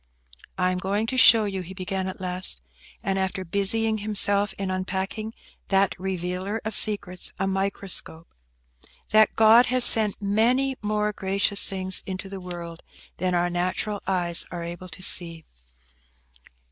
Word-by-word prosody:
"I 180 Hz, 0 st, +1 dB
am 180 Hz, -, -3 dB
going 200 Hz, +3 st, -1 dB
to 255 Hz, -, -3 dB
show 230 Hz, -4 st, +6 dB
you," 195 Hz, -2 st, -4 dB
he 185 Hz, +2 st, -10 dB
began, 190 Hz, 0 st, -3 dB
at 185 Hz, -, -5 dB
last, 180 Hz, -, -3 dB, 0.4 s
and 195 Hz, 0 st, -1 dB
after 190 Hz, 0 st, -2 dB
busying 215 Hz, +4 st, +2 dB
himself 205 Hz, -1 st, +2 dB
in 195 Hz, -1 st, -3 dB
unpacking 190 Hz, +3 st, -3 dB, 0.4 s
that 195 Hz, 0 st, +3 dB
revealer 185 Hz, +2 st, -3 dB
of 220 Hz, -, -3 dB
secrets, 200 Hz, -4 st, +2 dB
a 190 Hz, -, -1 dB
microscope,–"that 165 Hz, -, -2 dB
God 225 Hz, +2 st, +6 dB
has 255 Hz, 0 st, +3 dB
sent 215 Hz, -4 st, +4 dB
many 240 Hz, +7 st, +1 dB
more 210 Hz, 0 st, -1 dB
gracious 200 Hz, +1 st, 0 dB
things 190 Hz, -1 st, -1 dB
into 190 Hz, +1 st, -6 dB
the 195 Hz, -1 st, -8 dB
world 170 Hz, -2 st, -8 dB, 0.4 s
than 180 Hz, 0 st, -1 dB
our 175 Hz, 0 st, +1 dB
natural 185 Hz, +4 st, -2 dB
eyes 175 Hz, -3 st, 0 dB
are 175 Hz, -1 st, -6 dB
able 175 Hz, +2 st, -8 dB
to 175 Hz, +3 st, -6 dB
see. 165 Hz, -3 st, 0 dB
190 Hz, 145 wpm, -24 LUFS, 180-210 Hz, 0.4 s, show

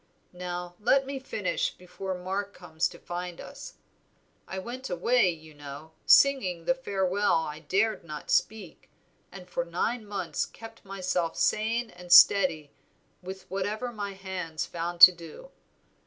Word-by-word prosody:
Now 180 Hz, 0 st, -5 dB
let 265 Hz, +5 st, +3 dB
me 275 Hz, 0 st, -5 dB
finish 210 Hz, -7 st, -2 dB
before 185 Hz, +1 st, -6 dB
Mark 195 Hz, +3 st, -4 dB
comes 170 Hz, -2 st, -2 dB
to 170 Hz, -, -12 dB
find 175 Hz, 0 st, -6 dB
us. -, -, -10 dB, 0.7 s
I 190 Hz, -, -6 dB
went 245 Hz, +7 st, -6 dB
away, 195 Hz, +4 st, +3 dB
you 160 Hz, -2 st, -8 dB
know, 145 Hz, +2 st, -10 dB, 0.2 s
singing 190 Hz, -12 st, +4 dB
the -, -, +3 dB
farewell 200 Hz, -5 st, 0 dB
I 150 Hz, 0 st, -6 dB
dared 195 Hz, +8 st, 0 dB
not 155 Hz, -3 st, -7 dB
speak, 205 Hz, -7 st, -1 dB, 0.4 s
and -, -, -11 dB
for -, -, -2 dB
nine 240 Hz, -, -2 dB
months 205 Hz, -1 st, -3 dB
kept 225 Hz, 0 st, -13 dB
myself 185 Hz, -4 st, -2 dB
sane 225 Hz, +2 st, 0 dB
and 180 Hz, 0 st, -12 dB
steady 175 Hz, -6 st, +6 dB, 0.5 s
with 190 Hz, +1 st, -8 dB
whatever 210 Hz, +6 st, -2 dB
my 205 Hz, -3 st, -5 dB
hands 185 Hz, -5 st, -5 dB
found 170 Hz, 0 st, -5 dB
to -, -, +13 dB
do. 175 Hz, -, -12 dB
190 Hz, 140 wpm, -28 LUFS, 175-215 Hz, 0.7 s, to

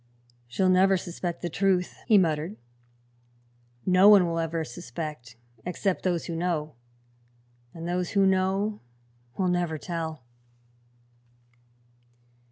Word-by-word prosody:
"She'll 185 Hz, +11 st, 0 dB
never 190 Hz, +1 st, +4 dB
suspect 175 Hz, -1 st, -5 dB
the 175 Hz, -, -1 dB
truth," 185 Hz, -1 st, 0 dB
he 220 Hz, -3 st, +6 dB
muttered. 165 Hz, +2 st, 0 dB, 1.3 s
"No 185 Hz, +2 st, +6 dB
one 200 Hz, -4 st, +7 dB
will 165 Hz, -1 st, -1 dB
ever 165 Hz, 0 st, -1 dB
suspect, 120 Hz, -1 st, -7 dB, 0.3 s
except 180 Hz, +1 st, -1 dB
those 175 Hz, -3 st, -1 dB
who 170 Hz, -, -4 dB
know; 165 Hz, -3 st, -2 dB, 1.0 s
and 165 Hz, 0 st, -7 dB
those 180 Hz, 0 st, -1 dB
who 195 Hz, -, +5 dB
know 190 Hz, +2 st, +1 dB, 0.6 s
will 190 Hz, -, +1 dB
never 175 Hz, -3 st, 0 dB
tell." 160 Hz, -3 st, -5 dB
175 Hz, 110 wpm, -27 LUFS, 165-190 Hz, 1.3 s, one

